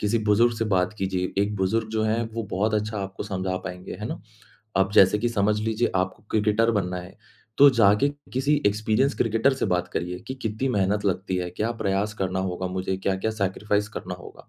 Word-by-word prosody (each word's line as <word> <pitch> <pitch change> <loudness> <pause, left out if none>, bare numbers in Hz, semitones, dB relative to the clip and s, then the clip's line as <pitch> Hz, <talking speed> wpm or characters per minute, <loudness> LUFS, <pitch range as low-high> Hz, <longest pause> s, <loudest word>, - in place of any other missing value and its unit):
किसी 105 +2 +1
बुज़ुर्ग 115 +3 +4
से 115 - 0
बात 95 -2 +1
कीजिए। 95 -1 -1
एक 105 +1 -1
बुज़ुर्ग 110 +4 0
जो 110 0 0
है 110 +2 +1
वो 115 - -3
बहुत 105 +3 0
अच्छा 105 0 -1
आपको 95 0 -5
समझा 95 -2 -2
पाएँगे, 90 0 -6
हैं 105 +3 -5
ना? - - -5 0.6
अब 95 0 +3
जैसे 95 +1 +6
कि 120 - 0
समझ 105 -2 +1
लीजिए 110 +2 0
आपको 95 +3 -2
क्रिकेटर 110 +2 +2
बनना 90 -4 -1
है, 90 +2 -10 0.4
तो 145 0 +9
जाके 110 +2 +4 0.2
किसी 135 +4 +2
एक्सपीरियंस्ड 110 +6 +1
क्रिकेटर 115 +4 +2
से 130 - -1
बात 90 -2 0
करिए 90 +1 -3
कि 130 - -3
कितनी 115 +1 -2
मेहनत 105 -2 +1
लगती 95 -1 -1
है, 90 -1 -2
क्या 110 +6 -2
प्रयास 100 +2 0
करना 95 -2 -2
होगा 95 0 -2
मुझे, 95 +1 -2
क्या-क्या 95 +3 -1
सैक्रिफाइस 105 0 -1
करना 95 -4 -6
होगा? 90 - -13
105 Hz, 200 wpm, -25 LUFS, 95-110 Hz, 0.6 s, तो